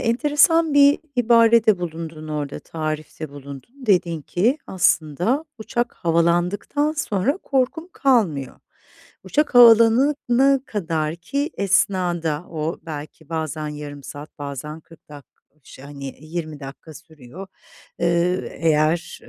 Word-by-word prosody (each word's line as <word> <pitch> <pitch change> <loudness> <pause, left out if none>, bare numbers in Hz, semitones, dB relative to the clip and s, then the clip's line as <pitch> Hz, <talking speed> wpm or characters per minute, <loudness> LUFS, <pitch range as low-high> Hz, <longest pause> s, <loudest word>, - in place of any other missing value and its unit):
enteresan 295 +6 +3
bir 285 0 +6 0.2
ibarede 230 -3 +4
bulundun 160 -2 -6
orada, 150 -2 -4
tarifte 155 -1 -5
bulundun. 140 - -11 0.2
Dedin 175 -6 +1
ki 230 - 0
aslında 180 - +1
uçak 240 +2 -3
havalandıktan 175 - 0
sonra 275 - -1
korkun 275 +3 -1
kalmıyor. 190 - 0 0.6
Uçak 295 -3 0
havalanana 245 +3 +5
kadarki 175 - -3
esnada; 180 -5 0
o 160 0 -3
belki 155 0 -9
bazen 155 -2 -3
yarım 145 -1 -8
saat, 145 +3 -10
bazen 145 +2 -6
40 165 +1 -20
dak 145 -2 -12 0.2
o - - -44
ş 130 - -14
hani, 140 -1 -8
20 155 -1 -6
dakika 140 +3 -10
sürüyor. 160 +1 -12 0.5
Eee, 170 +1 +1
ııı, - - -6
eğer 160 +2 0
170 Hz, 110 wpm, -22 LUFS, 155-235 Hz, 0.6 s, bir